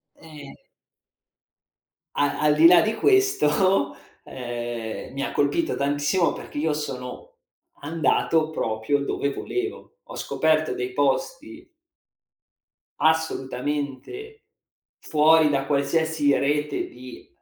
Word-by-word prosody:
Ehm. 150 -3 -12 1.6
A 145 0 0
al 150 -1 +4
di 160 +2 +7
là 175 0 +7
di 220 +1 -1
questo, 195 - +2 0.3
ehm, 120 -2 -6
mi 140 0 -3
ha - - -3
colpito 320 - 0
tantissimo 145 +5 +1
perché - - -9
io 155 +1 0
sono 150 - -7 0.4
andato 160 +1 +1
proprio 115 -1 -1
dove 140 0 -1
volevo. 395 - -5
Ho - - -11
scoperto 155 0 +1
dei 125 +1 -4
posti 265 - -2 1.3
assolutamente 150 - -2 0.6
fuori 155 0 +4
da 135 -2 0
qualsiasi 145 +1 +1
rete 150 +1 -1
di 125 0 -12
150 Hz, 100 wpm, -24 LUFS, 140-165 Hz, 1.6 s, di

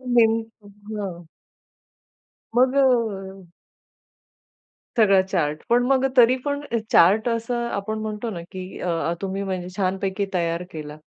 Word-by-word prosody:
Name 225 -2 +6 0.3
हां. 205 -4 -7 1.3
मग 255 +1 +4
अ 205 -8 +1 1.5
सगळा 200 -4 +5
चार्ट 165 -6 -1
पण 240 +1 +4
मग 270 0 +3
तरी 245 +1 +7
पण 285 0 -1 0.3
चार्ट 205 +7 +5
असं 235 +1 -1
आपण 215 0 -3
म्हणतो 215 +1 -4
ना, 175 -5 -5
की 185 -1 -8
अह, 170 -1 -1
तुम्ही 195 0 -3
म्हणजे 185 -2 -3
छानपैकी 195 +1 -1
तयार 170 -1 0
केला. 150 -1 -7
200 Hz, 120 wpm, -23 LUFS, 185-230 Hz, 1.5 s, तरी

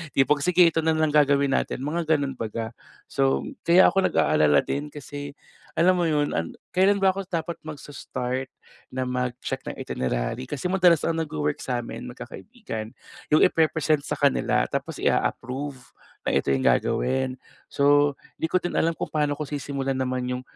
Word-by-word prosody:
Yung 135 - +4
pag 150 - +4
sige 180 +4 +4
ito 160 - 0
na 160 0 +2
lang 155 -1 +2
gagawin 140 -2 +3
natin 130 - -2
mga 160 +3 -2
ganon 140 -2 -2
baga. 115 0 -4 0.4
So 70 0 +1 0.2
kaya 175 +2 +7
ako 195 -1 +3
nag-aalala 75 -1 +3
din 145 +1 -3
kasi 145 0 -7 0.5
alam 180 +3 +5
mo 175 -2 +1
yun, 150 -1 +1
ang 80 +1 -3 0.2
kailan 195 +2 +4
ba 195 -1 +3
ako 195 - -4
dapat 170 -1 -2
magse-start 135 -4 -5 0.4
na 130 0 -3
mag-check 125 -1 -3
ng - - -5
itinerary 65 - -3
kasi 145 +3 -5
madalas 180 -3 +4
ang 165 0 0
nagwo-work 150 -2 -2
sa 125 -2 -2
amin 120 +1 -7
magkakaibigan 125 - -8 0.4
yung 155 - +6
ipe-present 155 -2 +2
sa - - -4
kanila 60 -2 +2
tapos - - -4
i-a-approve 135 +3 -1 0.5
na - - 0
ito 70 0 +1
yung 65 -1 +1
gagawin. 130 - +2 0.4
So 145 0 +3 0.3
di 160 - 0
ko - - +3
din 175 -1 -3
alam 165 0 +1
kung - - -2
paano 150 -2 +1
ko 150 - -3
sisimulan 140 -2 -3
naman 130 -1 -1
yung 125 - -4
145 Hz, 170 wpm, -25 LUFS, 125-160 Hz, 0.5 s, kaya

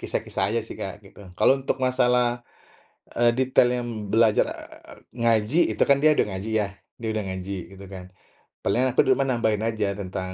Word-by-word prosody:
kisah-kisah 95 - -3
aja - - +2
sih, - - -9
Kak, 100 +2 -6
gitu. 100 - -16 0.2
Kalau - - +5
untuk 135 - -2
masalah, 125 -2 +1 0.8
eee, 120 0 +4
detailnya, 125 -1 +2
mmm, 110 -4 -6
belajar, 110 -2 +4
eee, - - -11 0.3
ngaji 115 +6 +2 0.2
itu - - 0
kan 140 -1 +4
dia 155 +2 +4
udah - - +2
ngaji 95 +4 -5
ya, 105 -2 +1 0.3
dia 115 - -2
udah 110 -1 -2
ngaji 95 +1 -5 0.2
gitu 95 +1 -12
kan. 95 -2 -9 0.6
Paling 125 +7 +2
aku 125 - +3
di - - +5
rumah 135 - 0
nambahin 110 -4 0
aja 110 -3 -1
tentang 95 -1 -5
110 Hz, 185 wpm, -24 LUFS, 100-125 Hz, 0.8 s, Kalau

